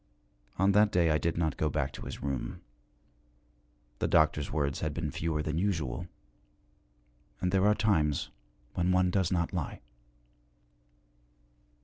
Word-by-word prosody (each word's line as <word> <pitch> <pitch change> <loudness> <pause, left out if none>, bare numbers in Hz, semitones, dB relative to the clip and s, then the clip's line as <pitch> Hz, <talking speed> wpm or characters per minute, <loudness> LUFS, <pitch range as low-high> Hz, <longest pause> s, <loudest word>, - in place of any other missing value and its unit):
On 95 +2 +4
that 105 +1 +4
day 85 -2 +3
I 75 - +2
did 85 -1 -1
not 80 -2 0
go 75 - +1
back - - -1
to - - -8
his - - -7
room. 70 -2 -3 1.4
The - - +1
doctor's 75 -2 +3
words 70 -2 -1
had 75 -2 -2
been 80 -3 -2
fewer 80 0 -2
than 75 +1 -1
usual, 85 -7 -1 1.3
and 90 - 0
there 95 +1 +3
are 105 - +4
times 80 -10 +1 0.4
when 90 +1 +1
one 90 0 +3
does 95 -2 +1
not 85 -1 0
lie. 80 -6 -3
85 Hz, 140 wpm, -30 LUFS, 75-90 Hz, 1.4 s, On